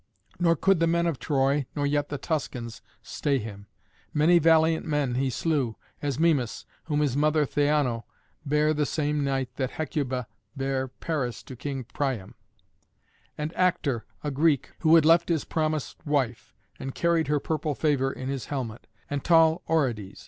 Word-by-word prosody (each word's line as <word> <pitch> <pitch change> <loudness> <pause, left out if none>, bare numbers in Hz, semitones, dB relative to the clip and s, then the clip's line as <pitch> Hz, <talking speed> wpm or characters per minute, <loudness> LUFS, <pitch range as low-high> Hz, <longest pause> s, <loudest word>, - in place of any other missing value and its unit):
Nor 170 -1 +4
could 195 -1 +3
the 165 - +3
men 170 +1 +2
of 165 -7 -1
Troy, 140 +1 +1
nor 145 -2 0
yet 145 0 0
the 145 - -3
Tuscans, 130 -6 -4 0.2
stay 140 -2 -1
him. 105 -4 -7 0.5
Many 165 +4 +5
valiant 160 0 +4
men 145 -6 0
he 130 +2 0
slew, 135 -5 0 0.3
as 140 -3 -2
Mimas, 150 -8 +1 0.2
whom 150 -2 0
his 140 -4 +1
mother 150 +1 +3
Theano 145 -5 +1 0.4
bare 150 +1 +2
the 150 -1 0
same 150 -1 0
night 135 -2 -2
that 130 -2 -1
Hecuba 130 -5 -2 0.3
bare 135 -1 -1
Paris 130 -1 -3
to 130 - -9
King 135 +1 -4
Priam; 130 -5 -3 1.0
and 150 +2 -3
Actor, 150 -10 +1 0.2
a 150 - -2
Greek, 145 -1 +2
who 160 0 +5
had 160 -2 +6
left 165 +2 +5
his 165 -3 0
promised 155 -2 -2
wife, 135 -6 -1 0.2
and 135 - -5
carried 170 -2 +2
her 150 0 +2
purple 150 0 -2
favour 135 -3 +1
in 130 - -6
his 135 -2 -3
helmet; 125 -6 -5 0.2
and 145 -1 -3
tall 165 0 +5
Orodes. 120 -11 0
145 Hz, 165 wpm, -27 LUFS, 130-160 Hz, 1.0 s, had